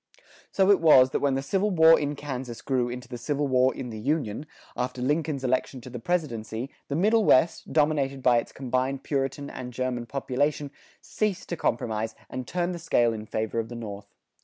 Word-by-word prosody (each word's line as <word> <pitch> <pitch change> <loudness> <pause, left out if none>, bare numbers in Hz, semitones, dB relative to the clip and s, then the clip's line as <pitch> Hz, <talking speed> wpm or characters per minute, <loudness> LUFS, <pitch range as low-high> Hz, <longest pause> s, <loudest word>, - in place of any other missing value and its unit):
So 195 0 +4
it 200 - +5
was 130 -6 +6
that - - 0
when 140 -2 +1
the 135 - -2
civil 195 +8 +1
war 165 -3 +6
in 145 0 -2
Kansas 130 -4 -6
grew 125 -3 0
into 125 0 -7
the 120 -1 -7
Civil 145 +3 -1
War 130 0 +3
in 125 -2 -6
the 110 - -6
Union, 140 0 -2 0.3
after 125 +1 -3
Lincoln's 145 +1 -1
election 130 +1 0
to 125 - -10
the 125 - -6
presidency, 120 -5 -2 0.2
the 140 - -2
Middle 215 +6 +3
West, 165 -1 +3
dominated 145 -3 +1
by 120 -2 +5
its - - -7
combined 130 +1 -2
Puritan 140 0 -2
and 125 -1 -7
German 125 -1 -3
population, 140 +3 -1 0.3
ceased 210 -4 -2
to 170 - -2
compromise, 110 -6 -1 0.2
and 130 -1 -5
turned 180 0 -1
the 170 - -6
scale 120 -8 +2
in 110 -1 -7
favor 110 +1 -2
of 115 0 -3
the 120 - -7
North. 105 -3 -7
130 Hz, 195 wpm, -26 LUFS, 120-150 Hz, 0.3 s, was